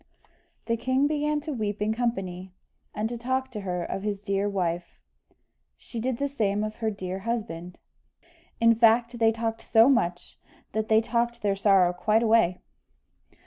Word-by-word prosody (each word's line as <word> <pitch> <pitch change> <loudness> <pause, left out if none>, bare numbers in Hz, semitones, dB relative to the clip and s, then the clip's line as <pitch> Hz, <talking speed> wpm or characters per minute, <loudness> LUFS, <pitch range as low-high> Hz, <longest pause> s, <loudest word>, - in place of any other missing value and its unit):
The 230 0 0
king 260 +4 +1
began 300 0 0
to 305 0 -5
weep 210 -4 -3
in 210 +1 0
company, 190 -6 -3 0.4
and 215 +1 -2
to 235 0 -6
talk 260 +2 -2
to 210 -4 -5
her 180 -2 -3
of 195 - -4
his 205 0 -2
dear 200 0 -1
wife 175 -3 -3 0.8
she 230 - -8
did 245 +1 -1
the 280 - -1
same 210 -7 -1
of 215 0 -5
her 225 -2 -1
dear 190 -2 -5
husband: 185 -6 -4 0.8
in 230 0 +6
fact 230 +1 +3
they 225 -1 +4
talked 225 0 -3
so 225 +3 +5
much, 175 -9 0 0.3
that 220 +1 -2
they 220 +1 +4
talked 235 0 -1
their 200 -1 +1
sorrow 195 -3 +4
quite 215 +5 +1
away. 220 -6 +3
220 Hz, 165 wpm, -26 LUFS, 195-235 Hz, 0.8 s, in